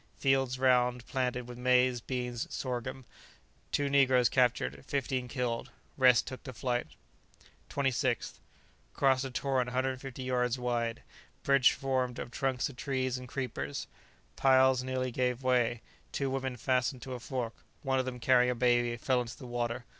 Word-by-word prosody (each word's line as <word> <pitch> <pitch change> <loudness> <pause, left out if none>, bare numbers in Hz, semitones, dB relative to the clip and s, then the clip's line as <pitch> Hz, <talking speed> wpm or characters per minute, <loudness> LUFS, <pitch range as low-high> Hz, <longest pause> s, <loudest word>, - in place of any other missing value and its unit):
Fields 135 -2 +2
round 125 -2 +3
planted 125 -2 -2
with 120 0 -9
maize, 125 -1 +3
beans, 125 -1 -3
and - - -21
sorghum. 130 0 -4 0.7
Two 145 - +1
negroes 130 -3 +4
captured, 95 - +1
fifteen 130 -2 -1
killed, 125 -3 -2 0.3
rest 125 -3 +5
took 130 - -7
to 130 - -8
flight. 120 +1 -1 0.8
26th. 130 -3 -1 0.6
Crossed 135 -1 +3
a - - -3
torrent 130 0 0
150 130 +1 -3
yards 125 -1 0
wide. 120 -2 -2 0.4
Bridge 140 -2 +5
formed 130 -2 -1
of - - -6
trunks 130 -1 0
of 135 - -11
trees 130 -3 -1
and 125 - -9
creepers. 120 - -4 0.5
Piles 130 -1 +5
nearly 130 0 -2
gave 125 +1 -1
way; 120 -2 +2 0.3
two 135 -1 -1
women 130 -1 -2
fastened 125 +1 0
to 130 - -6
a 125 - -5
fork; 120 -2 -3 0.3
one 135 -1 +1
of 130 - 0
them, 125 -1 -5
carrying 125 +1 +4
a 125 - 0
baby, 120 -1 +2
fell 125 +1 +1
into 120 -1 -7
the 130 - -10
water. 120 0 -3
125 Hz, 155 wpm, -31 LUFS, 125-130 Hz, 0.8 s, rest